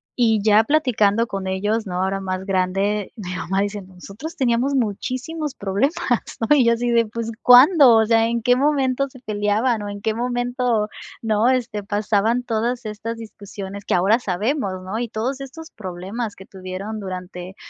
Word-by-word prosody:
Y 225 Hz, -4 st, +2 dB
ya 215 Hz, 0 st, +5 dB
platicando 230 Hz, -7 st, +2 dB
con 195 Hz, -3 st, -4 dB
ellos, 205 Hz, +4 st, -1 dB
¿no? 180 Hz, 0 st, -2 dB
Ahora 195 Hz, +1 st, -1 dB
más 185 Hz, 0 st, -4 dB
grande, 195 Hz, +2 st, 0 dB
mi 185 Hz, -5 st, -6 dB
mamá 190 Hz, +2 st, -1 dB
dice: 205 Hz, 0 st, -3 dB
"Nosotros 195 Hz, -, -10 dB
teníamos 255 Hz, +2 st, +1 dB
muchísimos 260 Hz, +6 st, -2 dB
problemas", 200 Hz, -, 0 dB, 0.5 s
¿no? 225 Hz, +6 st, +3 dB
Y 265 Hz, -4 st, +4 dB
yo 235 Hz, -, +5 dB
así 240 Hz, +1 st, -1 dB
de, 230 Hz, -1 st, +3 dB
"pues, 230 Hz, +1 st, -4 dB
¿cuándo?" 255 Hz, 0 st, +8 dB
O 220 Hz, 0 st, +4 dB
sea, 225 Hz, 0 st, +3 dB
¿en 235 Hz, 0 st, -1 dB
qué 245 Hz, +1 st, +4 dB
momento 275 Hz, -1 st, +1 dB
se 260 Hz, -, -15 dB
peleaban 215 Hz, +2 st, 0 dB
o 205 Hz, -, -5 dB
en 205 Hz, 0 st, -7 dB
qué 220 Hz, +1 st, 0 dB
momento?, 245 Hz, -2 st, -1 dB, 0.3 s
¿no? 220 Hz, 0 st, +2 dB
Este, 240 Hz, -5 st, -1 dB
pasaban 210 Hz, +3 st, 0 dB
todas 235 Hz, +1 st, -2 dB
estas 220 Hz, +2 st, -5 dB
discusiones 200 Hz, -3 st, -9 dB
que -, -, -1 dB
ahora 195 Hz, +6 st, +3 dB
sabemos, 210 Hz, +2 st, -1 dB
¿no? 195 Hz, +4 st, -4 dB
Y 240 Hz, -, -2 dB
todos 245 Hz, +6 st, -3 dB
estos 320 Hz, +5 st, -9 dB
problemas 200 Hz, +4 st, -6 dB
que 190 Hz, -, -13 dB
tuvieron 190 Hz, +3 st, -6 dB
durante 185 Hz, -1 st, -7 dB
220 Hz, 175 wpm, -21 LUFS, 200-245 Hz, 0.5 s, cuándo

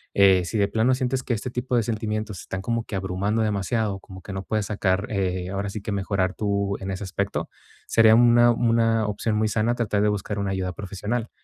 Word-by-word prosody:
eh 95 Hz, -2 st, +6 dB
si 110 Hz, -, -3 dB
de 100 Hz, -1 st, +3 dB
plano 115 Hz, +5 st, +2 dB
sientes 130 Hz, 0 st, -1 dB
que 125 Hz, -, -1 dB
este 120 Hz, +4 st, -5 dB
tipo 125 Hz, +1 st, -2 dB
de 115 Hz, -, +2 dB
sentimientos 110 Hz, -2 st, -3 dB
están 95 Hz, -, -5 dB
como 115 Hz, +3 st, -1 dB
que 105 Hz, -, -6 dB
abrumando 95 Hz, +4 st, -1 dB
demasiado, 105 Hz, 0 st, -1 dB
como 95 Hz, -1 st, -12 dB
que 100 Hz, -, -7 dB
no 95 Hz, 0 st, -4 dB
puedes 105 Hz, +1 st, -1 dB
sacar, 100 Hz, -1 st, 0 dB
eh 95 Hz, -3 st, -1 dB
ahora 100 Hz, +1 st, -2 dB
sí 105 Hz, +1 st, -6 dB
que 105 Hz, -, -4 dB
mejorar 95 Hz, -1 st, 0 dB
tú 100 Hz, -2 st, -1 dB
en 95 Hz, -, -5 dB
ese 95 Hz, +1 st, -4 dB
aspecto, 95 Hz, -, -2 dB, 0.4 s
sería 110 Hz, -1 st, +6 dB
una 120 Hz, 0 st, +6 dB
una 115 Hz, -1 st, +2 dB
opción 105 Hz, +1 st, -1 dB
muy 110 Hz, 0 st, +2 dB
sana 110 Hz, +2 st, +1 dB
tratar 105 Hz, -4 st, 0 dB
de 105 Hz, -, +3 dB
buscar 105 Hz, 0 st, -2 dB
una 100 Hz, -1 st, -1 dB
ayuda 95 Hz, -1 st, -2 dB
profesional. 105 Hz, +5 st, -4 dB
105 Hz, 215 wpm, -24 LUFS, 95-115 Hz, 0.4 s, eh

